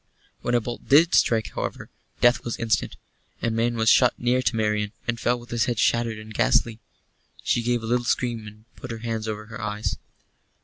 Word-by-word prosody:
When 120 - 0
a - - +4
bolt 120 +2 -7
did 165 +6 +6
strike, 110 -2 +3
however, - - -5 0.3
death 120 +1 +4
was 120 - -4
instant. 115 -2 0 0.5
A 115 - +1
man 115 +1 0
was 110 -1 0
shot 125 +2 +5
near 125 +1 +1
to 125 - 0
Marian, 105 -1 0
and 120 -1 -1
fell 120 +1 +1
with 120 0 -14
his 120 -1 +1
head 120 -2 -2
shattered 115 0 +1
and 110 0 -10
ghastly. 120 -1 +2 0.6
She 120 - +1
gave 120 0 0
a - - -4
little 120 +2 +1
scream, 120 -3 -1
and 105 +1 -13
put 130 - -9
her 115 - -4
hands 110 -1 -3
over 105 0 -4
her 110 0 -9
eyes. 105 0 -3
115 Hz, 205 wpm, -24 LUFS, 110-120 Hz, 0.6 s, did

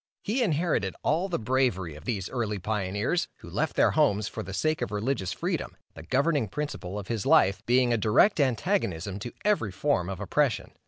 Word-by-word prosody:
He 235 +6 0
inherited 160 - 0
all 170 +6 +1
the 175 - 0
bravery 115 - 0
of 75 - -12
these 100 -7 -2
early 110 -5 -2
pioneers, 105 - -1
who - - -11
left - - -1
their - - +4
homes 105 +1 +2
for - - -5
the 95 - -7
sake 155 +12 0
of - - -1
religious 105 -2 -1
freedom, - - -3 0.2
the 80 - -10
governing 140 - +1
principle 105 -7 -5
of 100 -2 -6
his 115 -4 -2
life 100 +2 +4
being 125 0 +4
a - - +2
direct 115 - +4
antagonism 115 - 0
to 120 +3 -6
every 200 - +2
form 95 -2 0
of 95 - -5
oppression. - - 0
110 Hz, 190 wpm, -27 LUFS, 95-145 Hz, 0.2 s, their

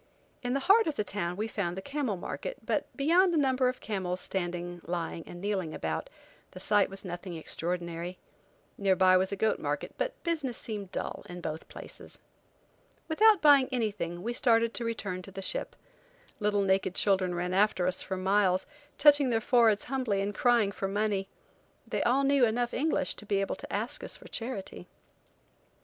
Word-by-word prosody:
In 245 +1 -1
the 275 - 0
heart 400 +6 +5
of 310 - -1
the 210 - 0
town 180 -3 -3
we 215 +2 -1
found 190 -5 -3
the - - -2
camel 275 -8 -2
market, - - -5
but - - 0
beyond 345 +5 +4
a - - +3
number 260 -3 +3
of 255 0 -5
camels 185 -4 -2
standing, 175 -2 -3
lying, 170 -1 -3
and 175 - -9
kneeling 190 -5 -2
about, 80 -1 -3 0.4
the 185 - -9
sight 205 +1 +3
was 195 +1 -7
nothing 175 0 -6
extraordinary. 170 +2 -3 0.6
Near 195 -2 +3
by 185 0 +5
was 190 +1 +2
a - - -1
goat 220 +2 +1
market, - - -3
but - - -2
business 305 -8 -1
seemed 205 -4 -5
dull - - -4
in 180 0 -7
both 160 -2 -5
places. - - -10 0.9
Without 420 +4 +5
buying 285 -3 +7
anything 205 -8 -2
we 235 +2 -2
started 230 -1 +3
to 240 - -3
return 205 -5 -3
to 190 - -11
the 195 - -7
ship. 190 - -3 0.6
Little 205 -1 +2
naked 190 -1 +1
children 190 -3 +2
ran 180 +1 -2
after 195 -2 +3
us 185 0 -1
for 190 - -4
miles, 190 0 +2 0.3
touching 290 -3 +6
their 230 -2 +2
foreheads 225 -3 +4
humbly 255 -6 -1
and 200 +1 -1
crying 235 -3 +3
for 195 - -3
money. 200 -1 -1 0.6
They - - -1
all 265 +3 +3
knew 275 -1 +4
enough 240 +1 +1
English 290 0 0
to 210 - -9
be 200 -1 +1
able 195 - -1
to - - -10
ask - - -2
us - - -4
for - - -14
charity. 210 - -6
205 Hz, 185 wpm, -30 LUFS, 185-250 Hz, 0.9 s, buying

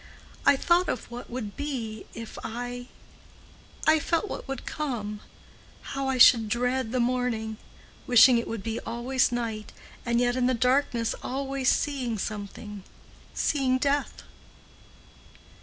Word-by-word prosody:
I 280 - +8
thought 345 +6 +2
of 240 - -4
what 240 +1 -8
would 235 -4 -5
be 240 -7 -4
if 230 -1 -8
I—I 245 +6 -4
felt 335 +6 0
what - - -6
would 270 0 -5
come—how 255 +1 -6
I 265 - 0
should 235 -3 +7
dread 245 +1 0
the 255 - 0
morning—wishing 240 0 +2
it 235 - -4
would 225 -3 -5
be 225 +1 -2
always 245 +2 0
night—and 235 0 -3
yet 245 0 +2
in 250 -1 +2
the 255 - +2
darkness 250 -2 +1
always 270 0 -1
seeing 260 -6 0
something—seeing 210 +6 -3
death. 280 +2 -1
245 Hz, 115 wpm, -27 LUFS, 225-265 Hz, -, I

